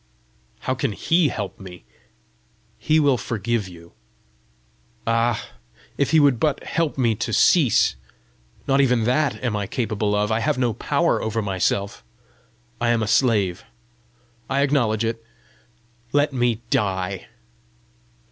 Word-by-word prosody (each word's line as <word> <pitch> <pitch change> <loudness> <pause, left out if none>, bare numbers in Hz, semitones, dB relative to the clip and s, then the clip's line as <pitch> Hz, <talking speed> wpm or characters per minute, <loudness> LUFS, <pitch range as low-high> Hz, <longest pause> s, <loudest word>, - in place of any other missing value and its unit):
"How 130 - -1
can 125 -4 -2
HE 165 - +2
help 105 -6 -5
me?" 90 -2 -11 1.0
"He 155 +1 +2
will 140 -5 +3
forgive 115 -1 -2
you." 85 -2 -14 1.1
"Ah, 115 0 0 0.5
if 140 - 0
he 160 - +5
would 140 -5 +4
but 150 -3 0
help 165 -4 -1
me 120 -4 +2
to 110 - -4
cease! 135 - +4 0.7
Not 135 0 +3
even 125 -4 +2
that 140 +6 +1
am 120 -4 -1
I 100 -1 -2
capable 110 -3 -1
of! 105 +1 0
I 110 - +1
have 115 - 0
no 120 -3 +1
power - - 0
over 110 0 -2
myself; 100 +1 -1 0.8
I 120 - +1
am 115 -2 +2
a - - -2
slave! 100 -7 +2 0.9
I 135 +1 +1
acknowledge 120 -6 +1
it. 115 0 -3 0.9
Let 145 0 +2
me 120 -3 0
die." 95 -6 -1
115 Hz, 135 wpm, -22 LUFS, 105-135 Hz, 1.1 s, he